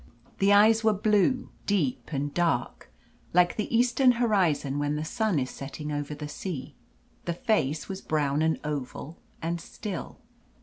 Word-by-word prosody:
The 195 +1 +4
eyes 220 +2 +6
were 220 -1 +4
blue, 215 +4 +2 0.2
deep, 170 -11 0
and 145 0 -2
dark 170 -8 -1 0.4
like 175 0 +4
the 210 - -3
eastern 250 +1 +4
horizon 180 - +1
when 145 0 0
the 155 +1 -3
sun 215 +1 0
is 130 -2 -1
setting 150 +2 -6
over 145 0 -3
the 150 0 -6
sea. 150 -2 -6 0.5
The 170 - -1
face 165 - 0
was 195 0 -5
brown, 150 -1 0
and 160 0 +1
oval, 150 +2 -5 0.2
and 170 +1 -2
still. 195 0 -6
170 Hz, 150 wpm, -27 LUFS, 145-210 Hz, 0.5 s, eyes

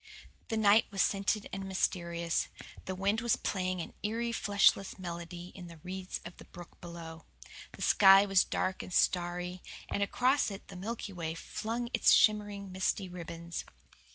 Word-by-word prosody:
The 225 - -2
night 215 +1 +5
was 195 -2 +2
scented 200 +1 0
and 195 0 -4
mysterious. 170 -3 -1 0.4
The 185 - -3
wind 200 +4 +1
was 235 0 +2
playing 185 -5 -2
an - - -8
eerie 230 +3 -1
fleshless 200 -3 +3
melody 175 -1 -7
in 180 -2 -9
the 170 -1 -11
reeds 185 +1 -5
of 175 - -9
the - - -13
brook 175 -1 -12
hollow. 165 -2 -9 0.5
The - - -6
sky 195 0 +7
was 195 -2 +4
dark 185 0 -2
and - - -9
starry, 180 +1 0 0.3
and 200 - -1
across 255 +7 +2
it 195 0 -9
the - - -9
Milky 205 +2 -5
Way 165 -2 -4
flung 230 +7 -4
its - - +5
shimmering 205 -2 +3
misty 190 +1 -1
ribbons. 170 -1 -6
190 Hz, 160 wpm, -31 LUFS, 175-205 Hz, 0.5 s, sky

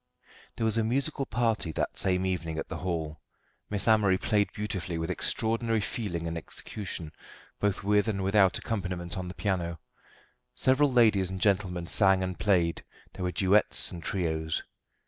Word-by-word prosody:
There 115 - -1
was 110 0 +2
a - - +2
musical 135 +4 0
party 115 -7 0
that - - -2
same 95 0 +1
evening 85 -4 -2
at 80 - -4
the - - -4
Hall. 80 -5 -3 0.5
Miss 105 +1 -1
Amory 105 -4 +4
played 105 +1 +1
beautifully, 95 -5 -3
with 80 0 -2
extraordinary 115 0 0
feeling 95 -5 -3
and 85 - -3
execution, 85 -2 -6 0.5
both 100 -1 0
with 105 +2 +3
and 100 -3 -1
without 95 -1 +4
accompaniment 90 -5 -3
on 90 -1 -4
the 90 - -7
piano. 85 -5 -2 0.8
Several 135 +2 +3
ladies 110 -7 +4
and 95 0 -5
gentlemen 95 -3 +1
sang 95 +1 +3
and 90 -1 -4
played; 90 -5 +2 0.3
there - - -8
were 90 0 0
duets 95 +4 +2
and 85 - -7
trios. 80 -3 -1
95 Hz, 160 wpm, -29 LUFS, 85-110 Hz, 0.8 s, Amory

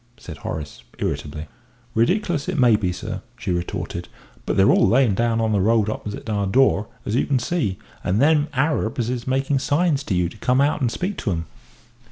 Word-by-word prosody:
said 80 -4 -9
Horace, 75 0 -6 0.2
irritably. 75 +1 -3 0.5
"Ridicklous 170 - +1
it 185 - -2
may 125 -4 +5
be, 100 -4 0
sir," 90 - -5 0.2
she - - -3
retorted, 85 0 -3 0.4
"but - - 0
they're 95 - +6
all - - +4
layin' 125 -3 +4
down 115 +2 +1
on 110 -1 +1
the 100 -2 +2
road 110 +1 +3
opposite 105 0 -6
our 100 -2 0
door, 110 -2 +3 0.2
as 105 - -2
you 125 - +1
can 140 - +2
see 120 - -1 0.3
and 95 +4 +1
them 150 +1 +4
niggers 130 -5 0
is 125 -1 -4
making 135 +1 +1
signs 145 +1 +1
to 95 - -1
you 90 -1 +2
to 90 - -11
come 125 +5 +1
out 145 +2 +2
and 120 -3 +1
speak 190 +10 -3
to - - -2
'em." 85 -1 -2
115 Hz, 200 wpm, -22 LUFS, 100-140 Hz, 0.5 s, they're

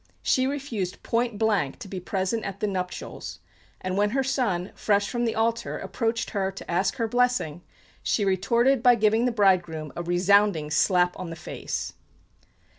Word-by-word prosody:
She 260 0 +2
refused 255 -10 -4
point 235 -2 0
blank 205 -10 +1
to - - -9
be 190 -1 -5
present 190 +4 -2
at 200 -1 -5
the - - 0
nuptials, 185 -3 -4 0.4
and 185 0 -3
when 205 +1 +2
her 270 - +2
son, 225 -9 -1
fresh 205 -1 +1
from 240 -1 -1
the 225 - -1
altar, 230 +1 0
approached 230 0 -2
her 195 -2 -1
to 195 - -8
ask 185 +4 +1
her 230 -3 -1
blessing, 245 -9 +1 0.4
she 205 - +1
retorted 235 +7 +2
by 245 -1 +6
giving 220 +1 +3
the 250 - +2
bridegroom 175 -8 +1
a - - -3
resounding 175 -2 +3
slap 180 +3 +3
on 185 -2 -5
the 165 - -6
face. - - -5
205 Hz, 170 wpm, -26 LUFS, 180-230 Hz, 0.4 s, by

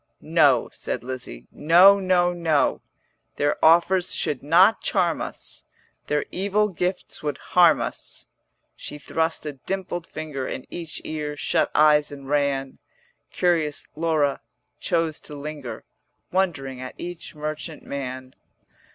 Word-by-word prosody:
'No,' - - +3
said - - -5
Lizzie, 125 - -7
'No, 180 +6 +6
no, 180 -2 +2
no; 165 -4 +1 0.5
Their 145 0 0
offers 175 +3 +4
should 145 - -1
not 180 +9 +5
charm 175 -4 +1
us, - - -7 0.4
Their 150 -1 0
evil 205 +3 +1
gifts 180 0 -3
would 150 -1 -2
harm 170 -5 +4
us.' - - -5 0.5
She 150 - -7
thrust 160 +3 -1
a 150 - -4
dimpled 175 +4 -4
finger 150 -4 -5
In 130 - -5
each 165 -3 -5
ear, 150 -1 -4
shut - - +1
eyes 150 -1 +5
and 140 -1 -9
ran: 140 -2 0 0.5
Curious 165 -5 0
Laura 155 -3 +1 0.4
chose 165 -2 0
to 150 - -11
linger 145 -3 -7 0.5
Wondering 140 -9 -1
at 130 - -7
each 175 -2 -7
merchant 155 +1 -5
man. 130 -1 -6
155 Hz, 125 wpm, -24 LUFS, 145-175 Hz, 0.5 s, No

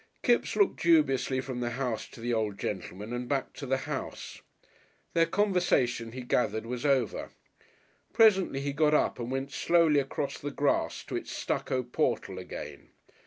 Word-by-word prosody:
Kipps - - +2
looked 405 - +2
dubiously 135 -6 +3
from 130 -2 -5
the 120 -1 -1
house 125 -4 -2
to - - -14
the 120 +1 -1
old 110 -3 -1
gentleman 100 +3 -5
and 120 0 -4
back 135 -2 -1
to 140 - -7
the 135 +1 +2
house. - - -5 0.7
Their 165 0 +4
conversation, 175 - +1
he 130 - -5
gathered, 110 -3 0
was 125 +1 -4
over. 130 -5 +1 0.8
Presently 195 -10 +4
he 140 0 -2
got 150 +1 +3
up - - +1
and 120 0 -4
went 135 +1 -3
slowly 165 +1 +3
across 140 +1 -3
the 145 - -4
grass 145 0 0
to - - -6
its - - -4
stucco 130 -1 -1
portal 120 -7 -1
again. 90 - -8
130 Hz, 165 wpm, -29 LUFS, 120-150 Hz, 0.8 s, Their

